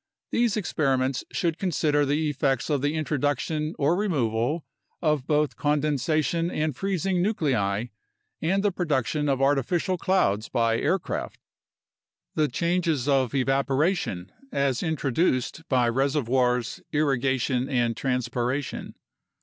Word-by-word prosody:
These 235 -3 +2
experiments 135 -9 0
should 170 -5 -1
consider 150 -5 +1
the 150 +3 +1
effects 135 0 0
of 145 -3 +1
the 145 +2 0
introduction 150 +1 -1
or 150 +4 +2
removal 145 - 0 0.3
of 150 -5 0
both 150 -1 +1
condensation 150 +2 +1
and 155 -4 -1
freezing 190 +1 0
nuclei 125 - 0 0.6
and 190 +5 +1
the 205 - +3
production 150 -4 0
of 135 -1 +1
artificial 150 +6 +1
clouds 110 - +1
by 115 -1 +1
aircraft. 190 -2 -2 0.9
The 155 -1 +2
changes 165 -1 0
of 135 -2 +2
evaporation, 135 - 0 0.2
as 140 - 0
introduced 160 -1 0
by 125 -3 +3
reservoirs, 125 -2 +1
irrigation, 135 -3 +1
and 120 -3 +1
transpiration. 125 +1 -2
145 Hz, 110 wpm, -26 LUFS, 130-160 Hz, 0.9 s, the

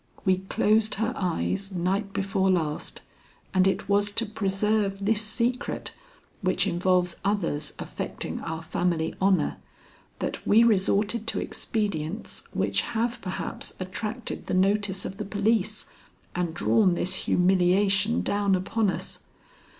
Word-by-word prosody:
We 190 -1 +4
closed 215 +3 +2
her 225 +4 -1
eyes 190 +2 -1
night 190 +3 -1
before 195 -1 0
last, 160 -5 -1 0.5
and 185 0 +4
it 195 - 0
was 205 +1 +3
to 230 +2 +1
preserve 200 -1 0
this 215 0 +3
secret, 235 +3 -2 0.5
which 185 -2 +1
involves 180 0 +1
others 165 -8 -1
affecting - - -5
our 160 0 -5
family 165 -1 0
honor, 190 0 +2 0.6
that - - -4
we 225 +3 +5
resorted 210 +1 +2
to - - +2
expedients 200 -4 -3
which - - +1
have 235 +1 -2
perhaps 185 -1 -4
attracted 215 +5 -4
the - - 0
notice 195 0 +1
of 195 - -6
the 210 - -3
police 210 +1 0 0.5
and 175 -2 -2
drawn 190 -1 +3
this 185 - 0
humiliation 195 +4 +3
down 200 -1 +2
upon 200 +3 0
us. - - -2
195 Hz, 125 wpm, -26 LUFS, 185-215 Hz, 0.6 s, we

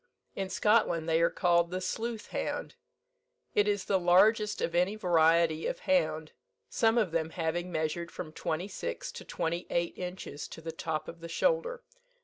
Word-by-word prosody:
In 195 -1 -3
Scotland 190 -7 +2
they 165 0 +3
are 170 - +4
called 170 -1 +2
the 185 +1 -3
Sleuth 225 +4 -4
hound. - - -3 0.8
It 205 0 +3
is 205 -2 0
the 195 - +2
largest 205 +5 +4
of 165 - -1
any 180 +4 +2
variety 165 -4 +3
of - - -4
hound, 160 - +1 0.4
some 225 0 +3
of 210 -7 +2
them 160 -1 0
having 175 +2 -2
measured 165 +1 -2
from 155 - -7
twenty 165 +3 -2
six 85 - -5
to - - -9
twenty 170 +2 -3
eight 170 0 0
inches 180 -5 -6
to - - -10
the 165 0 -5
top 160 -1 -3
of 170 - -8
the 170 0 -8
shoulder. 485 - 0
175 Hz, 170 wpm, -30 LUFS, 165-205 Hz, 0.8 s, are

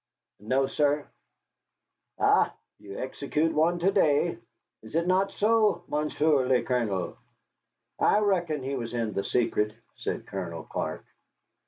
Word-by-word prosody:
"No, 130 +6 +1
sir." 145 +1 +1 1.1
"Ha! - - +4 0.3
You 100 -1 -9
execute 150 +4 -1
one 165 +3 +2
to 180 +3 +2
day. 155 -8 +2 0.4
Is 110 +6 -11
it 170 +1 +2
not 190 +2 +2
so, 210 -5 +2
Monsieur 150 -2 +1
le 125 -1 +3
Colonel?" 110 -8 -1 0.8
"I - - +4
reckon 175 -9 +1
he 135 +1 -2
was 120 -2 -4
in 115 -3 -1
the 100 - -1
secret," 105 -3 0 0.2
said - - -4
Colonel 85 -4 -5
Clark. - - -4
145 Hz, 130 wpm, -27 LUFS, 115-170 Hz, 1.1 s, Ha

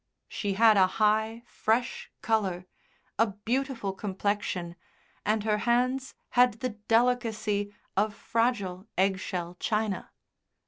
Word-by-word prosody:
She 205 -2 -2
had 220 +1 +6
a 190 -1 +6
high, 220 +2 +2
fresh 235 +3 -1
colour, 195 -5 0 0.5
a 225 - +5
beautiful 230 +1 -2
complexion 195 -3 -2 0.5
and 215 0 +2
her 210 -1 +1
hands 250 +3 +1
had 250 -1 +5
the 255 +3 -2
delicacy 220 -2 +1 0.2
of 210 +1 +1
fragile 215 -5 -1
egg 190 0 +2
shell 180 -2 -4
china. 215 -3 -1
215 Hz, 110 wpm, -28 LUFS, 195-230 Hz, 0.5 s, had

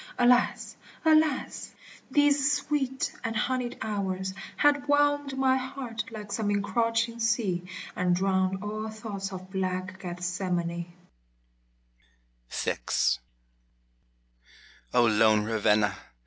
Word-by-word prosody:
Alas! 245 0 +3 0.3
alas! 310 -3 +2 0.3
these 290 -1 +4
sweet 280 -2 -1
and 225 -2 -2
honied 250 +1 -1
hours 190 -3 -2 0.2
Had 285 -1 +3
'whelmed 290 -1 +2
my 265 0 +3
heart 255 -3 -4
like 210 -2 -8
some 215 -1 -1
encroaching 230 +3 0
sea, 205 -6 0 0.3
And 180 -1 +2
drowned 190 0 +1
all 215 +1 -4
thoughts 215 -3 -5
of 185 0 -8
black 185 -1 -2
Gethsemane. 175 -1 -3 1.6
VI - - -1 2.1
O 120 -1 +4
lone 110 -1 +4
Ravenna 105 -2 +2
210 Hz, 95 wpm, -28 LUFS, 185-255 Hz, 2.1 s, these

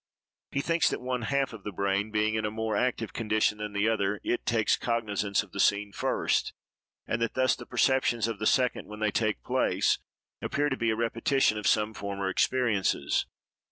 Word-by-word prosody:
He 140 - 0
thinks 165 +1 +2
that - - -3
one 125 0 -2
half 135 +2 0
of 110 -3 -10
the 105 - -4
brain 100 +2 0
being 110 0 +1
in 110 0 -1
a 105 - 0
more 110 0 -2
active 115 -1 -1
condition 110 -1 +1
than 105 -1 -5
the 100 +1 +1
other, 105 -2 0
it 120 - -2
takes 110 -2 +3
cognizance 105 -4 -1
of 100 - -17
the 100 - -7
scene 100 +1 +2
first; - - 0 0.5
and 110 - -2
that 115 - -1
thus 130 0 +3
the 120 - -11
perceptions 120 -4 +2
of 115 -3 -4
the 110 - 0
second, 125 -1 +1
when 105 0 -9
they 110 -1 +1
take 110 -1 0
place, - - +1 0.4
appear 145 +1 0
to - - -1
be 115 - 0
a 110 - +1
repetition 115 +2 +1
of 105 - -2
some 105 0 +2
former 100 -2 -3
experiences. 110 0 +1
110 Hz, 195 wpm, -28 LUFS, 105-120 Hz, 0.5 s, takes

